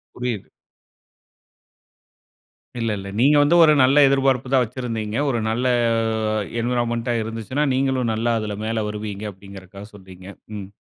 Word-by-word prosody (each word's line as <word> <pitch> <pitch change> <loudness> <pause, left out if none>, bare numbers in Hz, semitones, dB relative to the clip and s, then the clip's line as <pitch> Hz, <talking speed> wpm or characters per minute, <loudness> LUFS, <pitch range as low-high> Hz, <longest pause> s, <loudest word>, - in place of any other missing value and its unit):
புரியுது. 120 -5 -4 2.3
இல்ல, 115 -1 -1
இல்ல, 100 0 -8
நீங்க 145 +4 +5
வந்து 150 +4 +3
ஒரு 155 -2 +6
நல்ல 135 +3 +4
எதிர்பார்ப்பு 135 -2 +1
தான் 130 -2 +5
வச்சிருந்தீங்க, 115 -2 -4
ஒரு 120 - 0
நல்ல 120 +3 -1 1.0
என்வைரன்மென்ட்டா 120 0 -1
இருந்துச்சுனா, 115 +6 -3
நீங்களும் 130 -3 0
நல்லா 115 +2 0
அதில 105 -1 -4
மேலே 110 -1 -1
வருவீங்க 105 -1 -6
அப்படிங்கிதற்காக 100 +1 -12
சொல்றீங்க. 95 -1 -14 0.3
ம். 95 -2 -7
115 Hz, 120 wpm, -22 LUFS, 105-130 Hz, 2.3 s, ஒரு